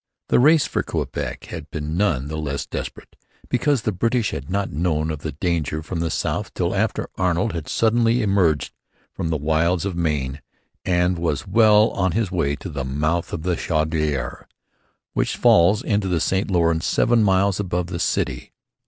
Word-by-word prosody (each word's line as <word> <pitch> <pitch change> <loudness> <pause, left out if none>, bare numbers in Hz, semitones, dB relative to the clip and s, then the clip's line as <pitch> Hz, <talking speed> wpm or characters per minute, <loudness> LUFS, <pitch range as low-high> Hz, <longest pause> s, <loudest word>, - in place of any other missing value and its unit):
The - - +4
race 150 +3 +5
for - - -1
Quebec - - -4
had 80 -3 -7
been 75 0 -4
none 85 -9 +1
the 75 +1 -4
less 70 -2 -3
desperate - - -7 0.3
because 125 -1 +1
the 110 - 0
British 115 +4 0
had 70 -3 -6
not 100 +1 -1
known 80 0 0
of 75 - -5
the - - -5
danger 80 -1 -1
from 85 +1 -4
the 85 0 -1
south - - -2
till - - 0
after - - -1
Arnold 95 +3 +1
had 85 -3 -5
suddenly 115 +1 +2
emerged 95 -7 +1 0.4
from 85 - -3
the 80 - 0
wilds 80 +4 +1
of 95 -3 -3
Maine 75 -4 -1 0.4
and 90 -1 +1
was 80 -4 -1
well 105 +2 +5
on 95 -3 0
his 110 -4 0
way 70 -6 0
to 95 - -8
the 70 -4 -4
mouth 75 +6 -1
of 80 - -4
the 90 0 0
Chaudiere, 75 -6 -1 0.7
which - - -1
falls 90 +5 +4
into 105 -2 0
the 90 -3 +1
St 95 +5 0
Lawrence 85 -3 +2
seven 120 -1 +3
miles 95 -1 +2
above 90 -3 -1
the 85 -1 -5
city. - - -2
85 Hz, 180 wpm, -22 LUFS, 80-100 Hz, 0.7 s, race